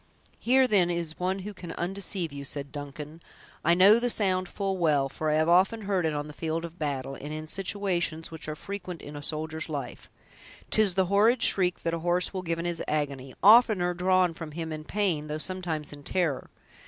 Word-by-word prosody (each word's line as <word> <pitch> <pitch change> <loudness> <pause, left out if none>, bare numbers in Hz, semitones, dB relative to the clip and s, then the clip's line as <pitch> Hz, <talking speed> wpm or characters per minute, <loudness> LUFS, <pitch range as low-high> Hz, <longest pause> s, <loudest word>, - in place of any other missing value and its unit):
"Here, 260 +2 +4
then, 190 -6 +3
is 170 -2 -3
one 185 +1 0
who 210 - -5
can 175 -3 -8
undeceive 185 -3 -3
you," 140 0 -6
said 140 0 -5
Duncan; 150 +2 -8 0.4
"I 170 +1 +4
know 200 +5 +7
the 245 +1 0
sound 185 -5 +1
full 195 -2 -2
well, 145 -5 +2
for 155 +3 -3
often 175 +8 +3
have 200 - -8
I - - +1
heard 180 -3 +1
it 155 - -2
on 145 0 -2
the 150 - -9
field 165 +2 -3
of 170 +1 -11
battle, 135 -3 -3
and 145 +2 -7
in 155 0 -5
situations 180 -3 -2
which 160 -2 -8
are 155 - -3
frequent 185 0 -7
in 145 - -9
a 145 - -6
soldier's 160 +2 -2
life. 140 -5 -6 0.6
'Tis 205 -5 +4
the 190 -1 +3
horrid 215 +6 +3
shriek 180 -2 +3
that 165 - -1
a 170 - -1
horse 175 +3 0
will 185 - -3
give 165 -2 -2
in 170 - -4
his 170 -1 -2
agony; 140 -3 -2
oftener 210 -4 +6
drawn 180 0 +2
from 160 -2 -8
him 160 0 -4
in 155 0 -7
pain, 180 -7 -1
though 150 0 -3
sometimes 160 -3 -4
in 145 - -11
terror. 160 -2 -1
170 Hz, 210 wpm, -28 LUFS, 155-190 Hz, 0.6 s, know